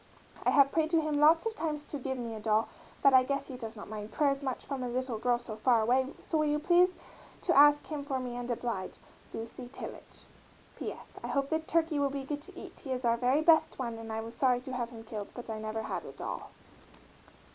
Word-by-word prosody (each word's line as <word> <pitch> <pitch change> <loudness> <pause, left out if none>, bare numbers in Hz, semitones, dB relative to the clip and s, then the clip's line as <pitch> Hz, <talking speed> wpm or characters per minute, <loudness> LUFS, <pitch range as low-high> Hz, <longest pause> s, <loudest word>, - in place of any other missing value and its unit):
I - - +3
have 275 -1 +5
prayed 315 -1 +1
to 330 -1 +3
him 305 -1 0
lots 320 +4 +6
of 450 - 0
times 305 -5 -3
to 290 - -5
give 265 0 -3
me 235 -2 -4
a 220 - -6
dol 215 +1 +2 0.4
but 275 - +7
I 260 - +9
gues 275 +1 -1
he 260 - -6
does 230 -2 -7
not 205 - -9
mind 210 0 -6
prayers 280 -2 +1
much 265 -2 -3
from 275 -2 -4
a 250 - -2
little 250 -2 -2
girl 245 +1 +2
so 240 -2 -7
far 230 +1 +3
away 255 +3 +3 0.2
so 320 - 0
will 305 - +2
you 295 0 +2
pleas 355 +4 +4 0.5
to 350 - +2
ask 290 +1 +7
him 300 -2 -4
for 275 -2 -2
me 250 -1 -4
and 245 0 -5
oblige 230 -5 -3 0.4
LUCY 235 +2 -7
TILLAGE. 275 - -9 0.5
P. - - -4
S. - - -13 0.3
I - - -3
hope 275 -1 -1
the 315 - +2
turkey 320 -1 +1
will 280 -1 +2
be 275 0 -4
good 290 +1 -4
to - - -12
eat, - - -10
he 270 - -7
is 255 -1 -2
our 230 0 +4
very 255 +5 +2
best 320 0 +4
one 235 -3 -3
and 225 0 -7
I 220 0 -2
was 225 +1 -7
sorry 250 -2 +2
to 260 0 -7
have 240 -2 -2
him 230 -2 -10
killed, 215 -2 -6
but 240 -2 -6
I 215 - -4
never 220 +1 -3
had - - -3
a - - -9
dol. - - -6
260 Hz, 250 wpm, -31 LUFS, 235-295 Hz, 0.5 s, I